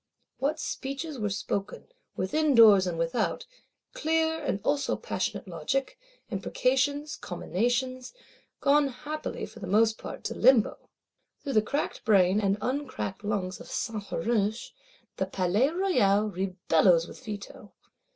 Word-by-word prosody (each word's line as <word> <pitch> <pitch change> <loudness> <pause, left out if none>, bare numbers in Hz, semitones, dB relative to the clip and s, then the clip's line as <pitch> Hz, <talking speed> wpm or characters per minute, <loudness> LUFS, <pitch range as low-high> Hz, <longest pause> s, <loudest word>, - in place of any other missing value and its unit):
What 300 +3 0
speeches 275 +1 -4
were 210 -1 -1
spoken, 200 +1 -4 0.3
within 295 +9 +1
doors 210 -5 +8
and 170 -2 -2
without; 165 +7 -1 0.5
clear, 320 +1 +1
and 255 -8 -1
also 285 +2 +1
passionate - - -3
logic; 265 - -2 0.3
imprecations, 265 +8 0
comminations; 245 +8 -2 0.5
gone 285 0 +4
happily, 295 +4 -5
for 225 - -12
most 220 +4 +2
part, - - -8
to - - -3
Limbo! 245 -3 +3 0.5
Through 275 - -3
the 215 - +5
cracked 280 +7 -3
brain, 195 -1 +4
and 200 0 +1
uncracked 255 -7 -3
lungs 195 -3 -2
of - - -11
Saint 220 -4 -3
Huruge, 215 +3 -1 0.5
the 190 - -1
Palais 190 +7 +1
Royal 215 - +2
rebellows 180 -2 +2
with - - -12
Veto. 205 -1 -8
220 Hz, 125 wpm, -28 LUFS, 195-275 Hz, 0.5 s, doors